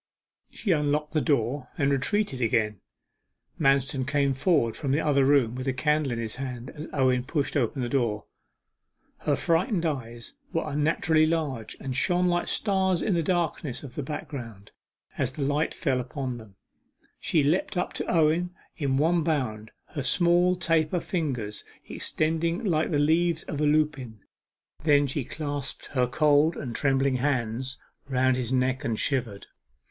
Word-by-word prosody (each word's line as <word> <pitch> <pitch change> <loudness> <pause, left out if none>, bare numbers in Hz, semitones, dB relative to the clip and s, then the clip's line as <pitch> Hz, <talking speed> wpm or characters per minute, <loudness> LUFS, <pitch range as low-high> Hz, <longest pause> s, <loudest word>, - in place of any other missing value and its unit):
She 200 - -2
unlocked 150 -1 +1
the 155 - +2
door, 135 -2 0
and 140 -2 +2
retreated 140 +1 0
again. 110 -4 +1 0.8
Manston 135 -2 +2
came 140 -1 +2
forward 130 - +2
from 140 -3 -2
the 145 - +2
other 145 -3 +3
room 135 -5 +3
with 130 +1 -5
a 135 - +1
candle 150 +1 +1
in 120 - -2
his 115 -1 -4
hand, 125 -2 -5
as 155 +1 -8
Owen 130 -3 +2
pushed 140 +2 -2
open 130 -1 0
the - - -1
door. 120 -5 0 0.9
Her - - +1
frightened 175 +2 +1
eyes 120 -6 -4 0.2
were 165 - 0
unnaturally 155 +1 +2
large, 145 -9 -2
and 130 -2 -4
shone 180 +6 +2
like 175 0 0
stars 190 -4 +1
in 205 - +1
the 170 - +2
darkness 165 -6 -1
of 130 -4 -9
the 145 - -3
background, 125 -8 -7 0.5
as 130 0 0
the 140 - -3
light 145 +3 +1
fell 135 -7 0
upon 125 -1 -4
them. 105 -4 -15 0.6
She 155 - +2
leapt 175 +6 +1
up 180 - -1
to - - -3
Owen 170 +2 +2 0.2
in 135 -4 0
one 165 +4 +3
bound, 125 -9 -1 0.2
her 150 - -4
small 175 +5 +3
taper 165 -1 +1
fingers 130 - -3 0.2
extended 165 +5 -1
like 160 -5 +1
the 150 - +1
leaves 165 +3 +2
of 150 - -4
a - - +3
lupine. 145 -8 0 0.6
Then 145 -2 +4
she 140 0 -2
clasped 145 -1 -5
her 125 -2 +2
cold 150 +4 +3
and 120 -5 -5
trembling 135 -1 +2
hands 130 -1 -1 0.3
round 130 -1 +2
his 125 -1 -3
neck 130 +1 +1
and 115 -5 -1
shivered. 120 -8 -1
145 Hz, 160 wpm, -27 LUFS, 130-160 Hz, 0.9 s, Then